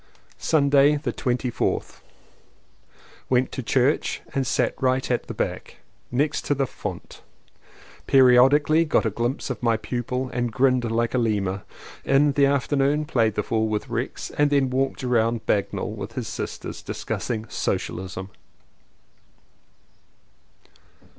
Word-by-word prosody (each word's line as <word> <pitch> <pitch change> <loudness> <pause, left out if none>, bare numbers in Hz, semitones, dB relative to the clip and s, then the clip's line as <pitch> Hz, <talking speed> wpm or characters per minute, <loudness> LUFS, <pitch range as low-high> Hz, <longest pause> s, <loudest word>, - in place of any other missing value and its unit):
Sunday 145 -1 +4
the 150 +2 -3
24th. 125 -1 -2 1.3
Went 130 0 +2
to - - -4
church 130 +4 +1
and 135 -2 0
sat - - +1
right 130 0 +1
at 120 - -1
the - - -5
back, - - -4 0.3
next 145 +5 0
to 145 - +1
the 135 0 +1
font. - - -7 0.9
Periodically 135 +5 +5
got 155 -6 +1
a 110 - +1
glimpse 120 +5 -2
of 125 - -6
my 115 -2 +2
pupil 125 +3 -3
and 120 -1 -1
grinned 125 0 +2
like 115 +1 0
a 130 - +2
lemur. 100 -4 0 0.4
In 140 +2 +3
the 140 0 +3
afternoon 140 +2 +1
played 115 -8 +1
the 105 - 0
fool 110 +1 0
with 110 +4 -3
Rex 120 +2 -4
and 145 0 +2
then 140 -3 +2
walked 135 +1 -1
round 115 -2 +1
Bagnell 100 -2 -1
with - - -7
his - - -4
sisters, - - -6
discussing 115 -2 -4
Socialism. 95 -1 -3
125 Hz, 130 wpm, -24 LUFS, 115-140 Hz, 1.3 s, Periodically